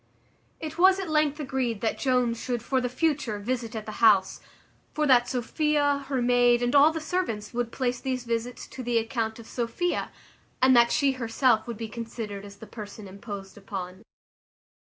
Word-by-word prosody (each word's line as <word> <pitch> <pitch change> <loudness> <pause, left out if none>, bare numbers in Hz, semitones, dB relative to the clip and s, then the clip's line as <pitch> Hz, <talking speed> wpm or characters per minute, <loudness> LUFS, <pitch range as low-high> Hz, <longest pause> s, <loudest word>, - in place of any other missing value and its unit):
It 320 +1 -6
was 380 +1 +6
at 370 -5 -4
length 305 -1 +2
agreed 260 -6 -2
that 225 - -1
Jones 250 -3 +1
should 245 -3 -2
for 260 +2 0
the 250 - -1
future 265 -5 0
visit 230 +1 -3
at 215 -1 -5
the 215 - -6
house: 200 -4 +4 0.5
for 305 - +1
that 245 -3 +4
Sophia, 285 +2 0
her 265 -3 0
maid, 245 0 +4
and 245 - 0
all 290 +2 +7
the 320 - -3
servants, 310 -11 -3
would 240 -1 -2
place 250 -1 -2
these 255 -2 -2
visits 235 +1 -3
to 260 - -8
the 240 -1 0
account 225 -1 -1
of 230 - -11
Sophia; 240 +11 -2 0.5
and 260 0 +5
that 235 0 +5
she 280 -2 +3
herself 235 -2 +1
would 235 -2 -5
be 225 0 -5
considered 220 -3 -6
as 200 0 -11
the 205 - -11
person 210 -2 -9
imposed 200 0 -8
upon. 190 -1 -7
245 Hz, 180 wpm, -27 LUFS, 225-270 Hz, 0.5 s, all